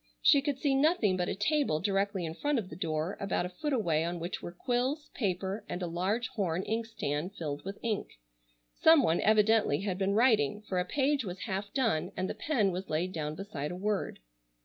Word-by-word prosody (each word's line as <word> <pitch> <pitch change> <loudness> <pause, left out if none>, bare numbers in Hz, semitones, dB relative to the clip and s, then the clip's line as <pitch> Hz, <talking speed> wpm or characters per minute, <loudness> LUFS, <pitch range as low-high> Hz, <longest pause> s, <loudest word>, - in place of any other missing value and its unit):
She 280 - +6
could 285 -1 -1
see 275 0 +1
nothing 270 - +3
but 180 -1 -1
a - - -1
table 260 - +1
directly 195 0 0
in 160 - -4
front 290 - 0
of 200 -6 -3
the - - -6
door 160 0 -2
about 195 -2 -1
a - - -4
foot 295 +12 -4
away 170 - +1
on 170 +1 -3
which 170 +2 -4
were - - -6
quills, 255 - -1
paper, 195 -1 -2
and 180 - -3
a - - 0
large 190 +8 -1
horn 185 -4 -1
inkstand 205 -7 -3
filled 145 -3 -4
with 195 +1 -6
ink. 220 -3 -2 0.6
Some 320 -3 +6
one 165 -6 +2
evidently 215 -6 +4
had 195 -2 -2
been 195 +1 +1
writing, 215 - +3
for 190 -3 -2
a 180 - 0
page 275 +5 +1
was 185 -2 -6
half 200 -1 -3
done, 225 - 0
and 185 +1 0
the - - -3
pen 230 -11 +1
was 185 +2 -5
laid 165 +4 0
down 150 -1 -3
beside 155 -6 -5
a - - -5
word. 205 +2 -2
195 Hz, 210 wpm, -31 LUFS, 175-230 Hz, 0.6 s, She